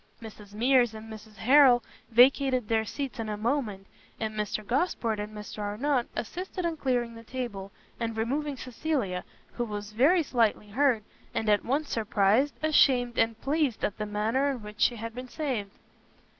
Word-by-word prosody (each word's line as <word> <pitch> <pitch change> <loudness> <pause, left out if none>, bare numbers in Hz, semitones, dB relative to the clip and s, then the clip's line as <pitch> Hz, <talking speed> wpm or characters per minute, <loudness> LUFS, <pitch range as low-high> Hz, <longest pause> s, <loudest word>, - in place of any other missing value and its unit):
Mrs 210 -2 -11
Mears 240 0 +3
and 220 0 -9
Mrs 215 0 -12
Harrel 255 0 +6 0.3
vacated 255 0 +4
their 220 0 +1
seats 270 +2 -5
in 220 -1 -3
a 210 - -3
moment, 220 -4 -1 0.3
and 220 -1 -2
Mr 210 0 -3
Gosport 240 - 0
and 210 +1 -4
Mr 210 0 -8
Arnott 240 +6 0
assisted 365 - -4
in 335 -1 -1
clearing 245 -5 -1
the 230 0 -11
table, 225 -6 -5 0.3
and 230 -1 -3
removing 275 +5 -1
Cecilia, 250 -8 -2 0.3
who 240 - -2
was 210 -2 -5
very 295 +11 +4
slightly 230 -6 +1
hurt, 245 -1 +2 0.3
and 220 - -1
at 205 -1 +3
once 285 +5 -1
surprised, 220 +4 +2
ashamed, 255 -6 +3
and 225 0 +1
pleased 285 -4 0
at 205 - -4
the 210 - -2
manner 220 +7 0
in 255 -5 -4
which 210 0 -10
she 240 - +4
had 230 0 -6
been 250 +1 -7
saved. 245 -8 -3
230 Hz, 170 wpm, -28 LUFS, 215-270 Hz, 0.3 s, Harrel